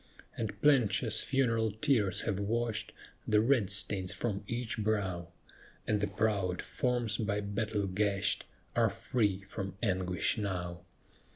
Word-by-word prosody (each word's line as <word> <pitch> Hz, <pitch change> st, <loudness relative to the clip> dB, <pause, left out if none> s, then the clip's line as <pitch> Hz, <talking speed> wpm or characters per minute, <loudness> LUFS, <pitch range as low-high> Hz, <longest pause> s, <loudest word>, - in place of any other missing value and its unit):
And 110 Hz, -3 st, -4 dB
plenteous 110 Hz, -6 st, +4 dB
funeral 115 Hz, -4 st, +2 dB
tears 110 Hz, -, +2 dB
have 100 Hz, -, -1 dB
washed 115 Hz, +2 st, -1 dB, 0.4 s
The 105 Hz, -1 st, +4 dB
red 115 Hz, -3 st, +3 dB
stains 95 Hz, -3 st, 0 dB
from 105 Hz, -4 st, -2 dB
each 120 Hz, -1 st, -3 dB
brow, 100 Hz, -5 st, -1 dB, 0.6 s
And 105 Hz, -2 st, +1 dB
the 105 Hz, -, +1 dB
proud 100 Hz, -3 st, 0 dB
forms, 120 Hz, -4 st, -1 dB
by 105 Hz, -2 st, 0 dB
battle 100 Hz, 0 st, -1 dB
gashed, 100 Hz, +1 st, 0 dB, 0.3 s
Are -, -, +4 dB
free 100 Hz, -6 st, 0 dB
from 95 Hz, -1 st, -5 dB
anguish 95 Hz, -1 st, +1 dB
now. 90 Hz, -4 st, -3 dB
105 Hz, 125 wpm, -32 LUFS, 95-115 Hz, 0.6 s, plenteous